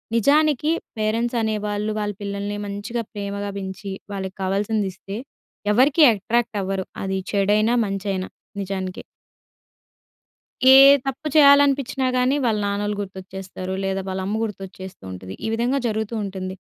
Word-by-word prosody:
నిజానికి 295 +4 +3 0.3
పేరెంట్స్ 230 +3 0
అనేవాళ్ళు 210 -1 -1
వాళ్ళ 205 0 -2
పిల్లల్ని 200 +1 -3
మంచిగా 205 +4 -4
ప్రేమగా 200 0 -4
బెంచి, 190 0 -6 0.2
వాళ్ళకి 190 -1 -5
కావాల్సిందిస్తే, 200 0 -2 0.6
ఎవరికీ 275 +7 +5
అట్రాక్ట్ 225 +2 -1
అవ్వరు. 190 0 -2 0.2
అది 190 0 -1
చెడైనా, 210 +3 +3
మంచైనా 195 -1 -3 0.3
నిజానికి. 190 -1 -4 1.7
ఏ - - +10 0.3
తప్పు 270 +3 -3
చేయాలనిపిచ్చినా 280 -2 +5
గాని, 255 +3 +2
వాళ్ళ 220 -3 +2
నాన్నలు 205 +1 -1
గుర్తొచ్చేస్తారు 190 -1 -7
లేదా, 195 0 -1
వాళ్ళ 190 0 -3
అమ్మ 215 +2 -1
గుర్తొచ్చేస్తూ 190 - -7
ఉంటది, 95 +1 -8
ఈ - - -1
విధంగా 245 +4 +1
జరుగుతూ 220 +1 -2
ఉంటుంది. 190 -1 -5
205 Hz, 120 wpm, -22 LUFS, 195-235 Hz, 1.7 s, ఏ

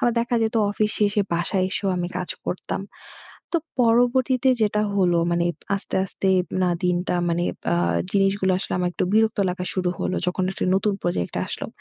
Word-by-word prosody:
আবার 240 - +3
দেখা 240 +1 -1
যেত 220 +2 0 0.2
অফিসে 210 +1 0
এসে 205 +1 0
বাসায় 185 +2 0
এসেও 195 +1 -2
আমি 175 -1 -2
কাজ 180 - -4 0.2
করতাম। 185 - -3 0.7
তো 340 - +3 0.2
পরবর্তীতে 245 +2 +3
যেটা 210 0 +2
হলো 180 -3 +3
মানে 170 0 +1 0.3
আস্তে, 195 - -3
আস্তে 190 0 -2 0.3
না 180 - +2
দিনটা 180 0 +1
মানে 170 +1 0 0.2
বা 85 - +1 0.4
জিনিসগুলো 195 -1 +2
আসলে 190 - -5
আমার 180 - +1
একটু - - -1
বিরক্ত 220 +1 +3
লাগা 180 0 -4
শুরু 180 -2 0
হল - - -1
যখন 180 +1 0
একটা - - -3
নতুন 200 +1 +1
প্রজেক্ট 175 - -2
আসলো। - - -5
195 Hz, 175 wpm, -23 LUFS, 180-220 Hz, 0.7 s, আবার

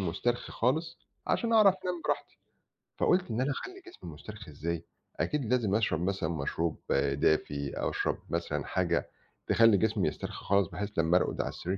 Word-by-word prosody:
مسترخي 105 +7 -1
خالص 160 +8 0 0.3
عشان 230 -1 +1
أعرف 210 -4 +7
أنام 180 -2 -2
براحتي. - - -2 0.6
فقُلت 180 -4 +2
إن 115 - 0
أنا 135 +2 +1
أخلّي 375 - -6
جسمي 355 - -10
مسترخي 105 +4 -10
إزاي، 85 +3 -3 0.4
أكيد 150 -3 0
لازم 110 -6 +2
أشرب 100 -7 +1
مثلًا 95 -3 -1
مشروب 80 +1 -2 0.3
دافي 70 0 +1
أو - - +1
أشرب - - -1
مثلًا - - -2
حاجة - - 0 0.4
تخلّي 115 -3 +6
جسمي 105 -2 +1
يسترخي 75 - -5
خالص 100 -2 +3
بحيث 105 +4 -4
لمّا 80 +2 +4
أرقد - - 0
على - - -2
السرير 95 +3 -3
105 Hz, 165 wpm, -30 LUFS, 85-135 Hz, 0.6 s, أعرف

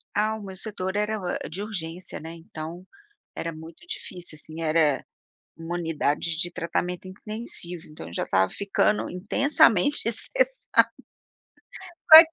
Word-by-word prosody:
Ah, 215 +1 +2
o - - -9
meu 190 -1 -7
setor 190 -2 -3
era 210 +1 0
o 185 - -5
eh, - - 0
de 185 +5 -5
urgência, 180 -4 -5
né, 160 +1 -8
então, 165 +1 -8 0.5
era 165 - -3
muito 160 - -12
difícil 175 - -7
assim, 160 +1 -7
era 155 -3 +3 0.5
uma 165 +1 -4
unidade 165 -1 0
de 175 +1 +2
tratamento 175 +2 -2
intensivo, 185 -4 -4
então 150 - -10
eu 85 - -10
já - - -1
estava 95 0 +2
ficando 200 +1 +1
intensamente 225 +5 +3
estressada. - - +3 1.6
Mas 320 +1 +13
180 Hz, 140 wpm, -26 LUFS, 165-210 Hz, 1.6 s, Mas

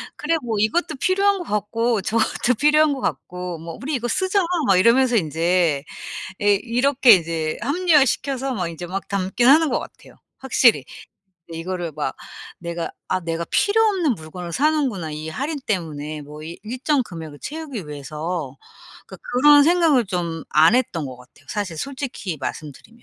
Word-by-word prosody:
"그래. 330 +2 0
뭐 225 -3 -2
이것도 315 +10 +1
필요한 395 +1 +2
것 - - -4
같고 215 +1 -1
저것도 230 +3 +1
필요한 300 0 +4
것 270 - -6
같고." 180 -5 -4
뭐 165 +1 -8
"우리 285 +2 -2
이거 240 -1 -2
쓰자." 375 - +1 0.3
막 195 -2 +5
이러면서 240 +5 +4
인제 165 -3 +1 0.6
예 205 0 +4
이렇게 250 +1 +4
이제 165 -4 +2
합리화시켜서 275 -3 +1
막 180 -5 -2
이제 170 +1 -7
막 195 +2 -5
담긴 200 +4 0
하는 310 +1 +6
것 - - +1
같아요 - - -11 0.2
확실히. 240 - +3 0.7
근데 165 -1 -7
이거를 175 0 -4
막 145 -3 -2 0.5
'내가 170 -1 -4 0.2
아 185 - +1
내가 170 -1 -3
필요 430 +2 +3
없는 370 - +2
물건을 170 0 -8
사는구나. 265 - 0
이 155 +1 -6
할인 285 - -3
때문에 155 -6 -3
뭐 150 +2 -10
이 170 +2 -8
일정 255 +5 0
금액을 160 -8 -9
채우기 285 - -6
위해서.' 150 0 -5 0.5
그러니까 - - -11 0.2
그런 290 +3 +7
생각을 325 -6 +4
좀 170 -3 -3
안 160 +10 +5
했던 175 - -1
것 130 -1 -8
같아요, 125 +3 -20
사실 200 -6 -3
솔직히 260 - -5
말씀드리면. 155 - -7
205 Hz, 340 characters per minute, -22 LUFS, 165-275 Hz, 0.7 s, 그런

